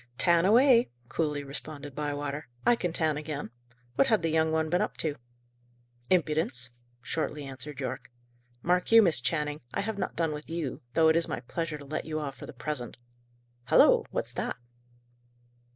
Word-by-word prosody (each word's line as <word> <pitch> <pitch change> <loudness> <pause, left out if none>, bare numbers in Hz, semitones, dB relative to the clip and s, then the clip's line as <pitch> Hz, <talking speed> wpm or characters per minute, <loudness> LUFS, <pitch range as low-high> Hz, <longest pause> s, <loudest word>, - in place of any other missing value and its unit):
"Tan 170 +3 +4
away," 240 +2 +6 0.2
coolly 150 -3 -1
responded 145 0 -7
Bywater. 145 0 -3 0.2
"I 240 - +6
can 180 -6 -2
tan 160 -3 +1
again. 150 -6 -5 0.4
What 270 - +3
had 220 -8 +3
the 165 - +1
young 160 0 +2
one 160 0 +1
been 175 +3 +1
up - - -2
to?" 155 -3 -1 0.9
"Impudence," 150 -8 +2 0.3
shortly 150 -1 -2
answered 135 +1 -7
Yorke. 130 - -4 0.5
"Mark 180 +3 +1
you, 225 0 +9
Miss 165 -9 +4
Channing! 150 +1 -1
I - - +1
have 205 0 -3
not - - -3
done 165 -2 0
with 150 +1 -7
you, 165 -5 -3
though 160 -1 +6
it 160 - +4
is 165 0 +2
my 120 - -3
pleasure 155 +4 -4
to 145 - -11
let 155 +3 -4
you 155 0 -3
off 145 -3 -4
for - - -10
the - - -7
present. 125 0 -5 0.7
Halloa! - - +6
What's - - -3
that?" - - -3
155 Hz, 175 wpm, -29 LUFS, 145-170 Hz, 0.9 s, you